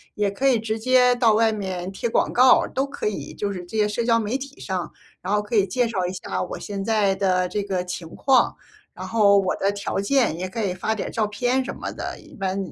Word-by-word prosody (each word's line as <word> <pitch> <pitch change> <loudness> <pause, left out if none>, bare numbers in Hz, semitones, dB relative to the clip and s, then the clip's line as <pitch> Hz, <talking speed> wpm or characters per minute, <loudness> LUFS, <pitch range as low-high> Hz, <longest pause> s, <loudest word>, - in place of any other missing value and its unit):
也 205 -1 +1
可 265 +7 0
以 260 -3 +4
直 220 0 -2
接 250 +1 +4
到 235 -3 +4
外 225 +1 +3
面 190 -3 -4
贴 195 +4 -3
广 225 - +1
告， 255 +1 +6
都 270 - -1
可 275 -5 -4
以， 210 - -4
就 205 -1 -3
是 180 -2 -6
这 175 - -10
些 210 -1 +3
社 230 +3 -2
交 230 -1 +4
媒 225 +4 -1
体 275 0 -9
上。 185 -3 -3 0.3
然 195 - -2
后 210 - +3
可 210 +2 -10
以 200 - +4
介 245 +4 +1
绍 190 -5 -1
一 180 - -3
下 190 - -4
我 180 - -6
现 200 -1 -5
在 210 -3 +2
的 185 -2 +1
这 210 - -2
个 190 -3 -2
情 180 -2 -6
况， 260 -3 +3 0.4
然 - - -8
后 205 -3 +4
我 190 -2 0
的 195 - +1
条 200 -1 -3
件， 225 - +2
也 185 - -3
可 220 +4 -4
以 190 -3 0
发 205 +4 -1
点 215 - -4
照 220 -2 0
片 245 +5 0
什 - - -5
么 - - -5
的。 - - -6
一 - - -17
般， 190 -1 -2
210 Hz, 270 characters per minute, -23 LUFS, 190-235 Hz, 0.4 s, 告